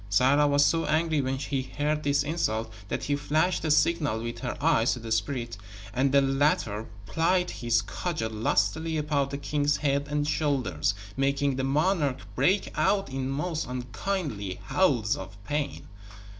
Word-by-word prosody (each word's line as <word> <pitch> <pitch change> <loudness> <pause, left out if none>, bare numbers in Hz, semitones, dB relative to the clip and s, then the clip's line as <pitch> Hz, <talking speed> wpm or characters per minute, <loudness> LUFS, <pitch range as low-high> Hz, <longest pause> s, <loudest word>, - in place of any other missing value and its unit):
Sarah 135 +8 +4
was 145 0 +4
so 165 +3 +2
angry 155 -1 +2
when 130 0 -1
she 135 0 -2
heard 150 +3 -2
this 140 -1 +2
insult 115 -8 -1
that - - -3
she 145 - 0
flashed 155 +5 +1
a 160 - 0
signal 150 -6 +2
with 115 0 -5
her 125 -2 -4
eyes 140 -6 +3
to 125 - -5
the 115 -1 -7
spirit, 115 0 -1 0.4
and 130 +3 +2
the 140 0 +5
latter 135 -6 +1 0.2
plied 180 - +1
his 120 -1 +1
cudgel 155 -11 -3
lustily 110 - 0
about 145 -2 0
the 140 - -4
king's 145 0 0
head 140 -1 0
and 145 0 0
shoulders, 130 - 0 0.2
making 140 0 +1
the 130 - -2
monarch 145 0 +1 0.2
break 175 - +2
out 195 -4 +2
in 135 0 -2
most 155 +4 -2
unkingly 125 - -3
howls 125 - +2
of 95 +2 -9
pain. 145 +4 -3
140 Hz, 160 wpm, -27 LUFS, 120-150 Hz, 0.4 s, the